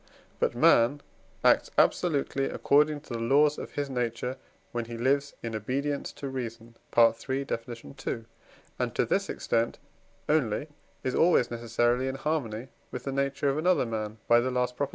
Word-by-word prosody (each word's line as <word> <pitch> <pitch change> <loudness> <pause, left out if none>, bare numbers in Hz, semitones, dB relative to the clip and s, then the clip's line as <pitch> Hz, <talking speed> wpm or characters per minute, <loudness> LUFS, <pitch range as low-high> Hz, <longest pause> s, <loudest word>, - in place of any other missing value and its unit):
But - - +1
man 125 +5 +4 0.4
acts - - +4
absolutely 140 -4 +2
according 150 +2 +2
to 135 - -9
the 115 - -2
laws 145 +6 +3
of - - -7
his 145 -1 -2
nature, 125 0 -2 0.3
when 120 -1 -2
he 115 0 -7
lives 140 +4 +1
in 115 -1 -4
obedience 140 +6 -2
to 140 - -6
reason 115 -3 -6 0.2
(III. 120 +4 +3
Def. 115 -2 -4 0.2
ii.), 125 -4 -5 0.5
and - - -1
to - - +2
this - - 0
extent 115 0 0 0.5
only 150 -1 +1 0.3
is 130 - -1
always 165 -8 +4
necessarily 120 +2 +1
in 130 - -2
harmony 135 -5 -2 0.2
with 125 - -6
the 135 - -3
nature 140 +1 0
of 135 +2 0
another 180 -3 +3
man 110 -1 -4
(by 120 - +6
the 125 +2 0
last 125 0 0
Prop.) 140 +1 -1
130 Hz, 165 wpm, -28 LUFS, 115-140 Hz, 0.5 s, by